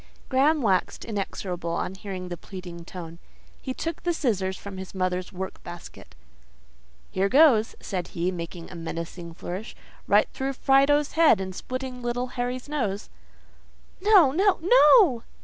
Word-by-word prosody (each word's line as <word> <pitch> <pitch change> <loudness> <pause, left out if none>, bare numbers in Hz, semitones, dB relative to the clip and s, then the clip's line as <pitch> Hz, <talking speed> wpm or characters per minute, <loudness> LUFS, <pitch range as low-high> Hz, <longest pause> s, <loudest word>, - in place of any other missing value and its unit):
Graham 285 +2 +3
waxed 190 -4 0
inexorable 190 -5 -4
on 185 - -2
hearing 190 -2 -7
the 175 - -4
pleading 175 -1 -9
tone; 170 -2 -9 0.4
he 260 - -4
took 330 +5 -4
the 345 - 0
scissors 190 - -1
from 200 -1 -9
his 190 +1 -9
mother's 185 0 -1
work 190 0 -6
basket. 175 -1 -11 1.0
"Here 195 +1 +1
goes!" 260 -5 +5
said 180 -3 -4
he, 175 +2 -2
making 170 -1 -7
a - - -9
menacing 170 0 -6
flourish. 185 +6 -6 0.3
"Right - - +4
through 270 +1 -2
Fido's 275 +2 +3
head, 320 - +5
and 190 -1 -4
splitting 255 +4 -5
little 245 +1 -2
Harry's 245 +1 -4
nose." 220 -10 -3 0.9
"No! 385 -9 +6
No! 380 +6 +3
NO!" 340 - +6
205 Hz, 145 wpm, -26 LUFS, 180-270 Hz, 1.0 s, No